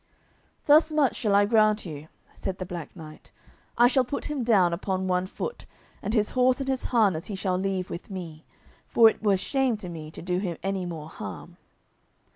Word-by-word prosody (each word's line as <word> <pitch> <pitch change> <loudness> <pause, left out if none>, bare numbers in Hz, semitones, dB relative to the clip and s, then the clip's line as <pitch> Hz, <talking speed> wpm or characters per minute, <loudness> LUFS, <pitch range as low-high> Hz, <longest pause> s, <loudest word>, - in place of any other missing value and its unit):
"Thus 310 +2 +6
much 300 -4 +2
shall 210 -4 +1
I 205 0 +5
grant 215 -1 +3
you," 155 -2 -8 0.3
said 190 -1 -4
the 185 - -5
Black 175 -3 -7
Knight: 155 -3 -12 0.5
"I 240 +1 +7
shall 260 +1 +3
put 250 +3 -4
him 295 -4 -2
down 195 -7 +4
upon 190 +1 -2
one 180 0 0
foot, 475 - -6 0.3
and 210 +4 -2
his 210 -2 +1
horse 255 0 +3
and 270 - -3
his 265 -1 -1
harness 200 -9 +2
he 205 - -5
shall 190 -1 -1
leave 190 -1 -2
with 170 - -7
me, 170 -5 -7 0.4
for 225 -1 +6
it - - -14
were 205 -3 +3
shame 260 +3 0
to 190 -4 -7
me 160 -2 -7
to 160 - -10
do 180 0 -1
him 180 -4 -3
any 195 -2 -2
more 160 -3 -6
harm." 100 - -9
195 Hz, 200 wpm, -26 LUFS, 175-235 Hz, 0.5 s, I